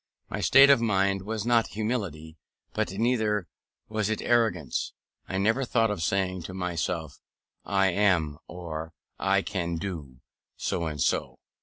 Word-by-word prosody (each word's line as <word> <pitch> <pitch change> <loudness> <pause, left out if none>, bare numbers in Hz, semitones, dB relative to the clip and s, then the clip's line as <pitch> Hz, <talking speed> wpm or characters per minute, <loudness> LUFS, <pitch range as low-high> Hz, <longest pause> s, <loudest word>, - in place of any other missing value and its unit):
My - - -3
state 135 +1 +7
of 135 - +5
mind 100 -3 +2
was 110 +2 -4
not 120 -1 +3
humility, 95 -9 -3 0.4
but - - -1
neither 105 -2 +1 0.4
was 110 -1 -1
it 110 - -1
arrogance. 115 - +1 0.4
I 95 - -1
never 110 +7 +2
thought 115 -3 +2
of 100 -5 -3
saying 95 +1 0
to 95 - -7
myself, 85 -3 -3 0.5
I 95 -1 +2
am, 85 -6 +2
or 80 -2 -6 0.3
I 95 0 +2
can 85 -3 -2
do, 80 -9 -6 0.4
so 85 - -1
and 75 -2 -5
so. - - 0
95 Hz, 145 wpm, -27 LUFS, 85-110 Hz, 0.5 s, state